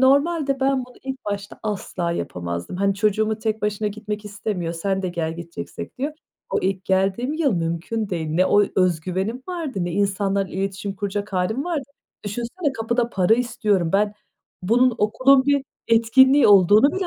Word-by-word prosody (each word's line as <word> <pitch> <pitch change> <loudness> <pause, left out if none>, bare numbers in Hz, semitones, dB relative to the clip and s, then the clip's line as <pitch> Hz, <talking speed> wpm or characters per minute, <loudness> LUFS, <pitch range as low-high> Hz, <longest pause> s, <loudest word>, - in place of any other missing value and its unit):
normalde 280 +1 +3
ben 270 -1 +1
bunu 250 - -17
ilk 265 -1 -6
başta 205 0 -5
asla 190 -5 -2
yapamazdım. 85 - -4
Hani, 200 +1 +1
çocuğumu 215 +2 +1
tek 220 -1 -2
başına 210 0 0
gitmek 210 0 -6
istemiyor, 200 -4 -3
"Sen 190 +3 -2
de 185 - -1
gel 165 -2 -3
gideceksek." 170 +7 -8
diyor. 290 +3 -2 0.4
O - - +1
ilk 190 0 -1
geldiğim 195 +8 +1
yıl 310 -5 +1
mümkün 170 +6 -2
değil. 165 -3 -2
Ne 180 +4 +3
o 205 0 +5
özgüvenim 185 +6 0
vardı 325 - -4
ne 175 - -3
insanlarla 195 0 0
iletişim 195 +1 -3
kuracak 205 +1 -3
hâlim 195 +9 0
vardı. 325 -6 -2 0.4
Düşünsene 240 - -3
kapıda 235 +1 0
para 190 +3 +3
istiyorum. 220 -8 0
Ben 205 +1 +2 0.5
bunun 245 +5 +3
okulun 260 +6 +4
bir 285 -1 +2 0.2
etkinliği 260 +5 +5
olduğunu 205 +7 +6
bile 380 -1 -2
210 Hz, 160 wpm, -22 LUFS, 190-250 Hz, 0.5 s, olduğunu